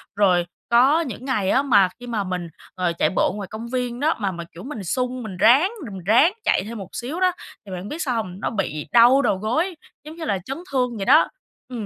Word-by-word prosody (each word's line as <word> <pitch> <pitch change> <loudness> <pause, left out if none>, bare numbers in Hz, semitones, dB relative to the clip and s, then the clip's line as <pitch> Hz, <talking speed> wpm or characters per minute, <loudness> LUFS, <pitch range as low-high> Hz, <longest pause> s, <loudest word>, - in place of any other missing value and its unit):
Rồi 180 -4 +3 0.2
có 265 +8 +5
những 255 -4 -6
ngày 210 -8 0
á 270 - +3
mà 200 -9 +4
khi 245 - -10
mà 220 -4 -1
mình, 180 -2 -4 0.3
ờ, 180 -2 0
chạy - - +2
bộ - - +2
ngoài 200 -2 -6
công 225 +2 -6
viên 245 -1 -3
đó 310 +3 +2
mà 200 -3 -1
mà, 170 -1 -6
kiểu, 175 +4 -11
mình 245 -7 -6
sung, 250 +5 -2
mình 190 -4 -7
ráng, 275 - +5
mình 190 -5 -8
ráng 265 - +5
chạy - - +2
thêm 225 +2 -7
một 195 -3 -8
xíu 275 +9 -4
đó 370 -1 +3 0.3
thì 195 - -10
bạn 185 +3 -6
biết 325 +2 -5
sao 250 -4 -1
hông? 185 -4 -4
Nó - - -1
bị 160 -8 -3
đau 245 +4 +6
đầu 195 - +1
gối, 310 - -1 0.3
giống 310 +2 -10
như 330 - -6
là 200 -2 0
chấn 270 +3 -4
thương 250 -3 0
vậy 195 - -3
đó. 300 +5 +6 0.4
Ừm, 235 -5 -5
235 Hz, 245 wpm, -22 LUFS, 195-265 Hz, 0.4 s, đau